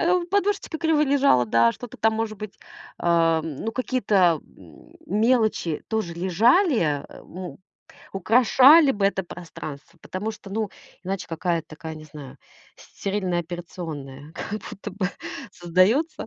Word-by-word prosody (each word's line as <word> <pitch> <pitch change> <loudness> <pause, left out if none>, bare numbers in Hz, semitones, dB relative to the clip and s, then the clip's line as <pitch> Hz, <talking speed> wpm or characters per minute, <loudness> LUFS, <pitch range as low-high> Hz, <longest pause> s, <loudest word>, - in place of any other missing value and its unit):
А, 350 +2 +3
у 345 -1 -2
подушечка 400 -3 0
криво 320 -2 +2
лежала, 275 - +4
да, 115 +1 +4
что-то 245 -3 -10
там 220 0 +2
может 220 -1 -2
быть, 215 -2 -7 0.4
а, 165 -1 +3
ну, 160 +8 -4
какие-то, 205 - +2
м, - - -18 0.2
мелочи 220 - +1
тоже 220 -6 -2
лежали, 230 - +3
а, 145 -2 -1
м, 180 0 -9 0.6
украшали 255 - +6
бы 200 -1 -1
это 190 -1 0
пространство. 155 -4 -9
Потому 205 +4 -4
что, 215 -2 -11
ну, 215 0 -2 0.3
иначе 195 0 -3
какая-то 165 -1 -1
такая, 160 +1 -8
не 155 - -11
знаю, 145 -3 -11 0.4
стерильная 190 -3 -3
операционная 160 -4 -8
как 210 0 -5
будто 205 +1 -7
бы 190 -2 -1 0.4
создаётся. 185 - +1
195 Hz, 135 wpm, -24 LUFS, 165-230 Hz, 0.6 s, украшали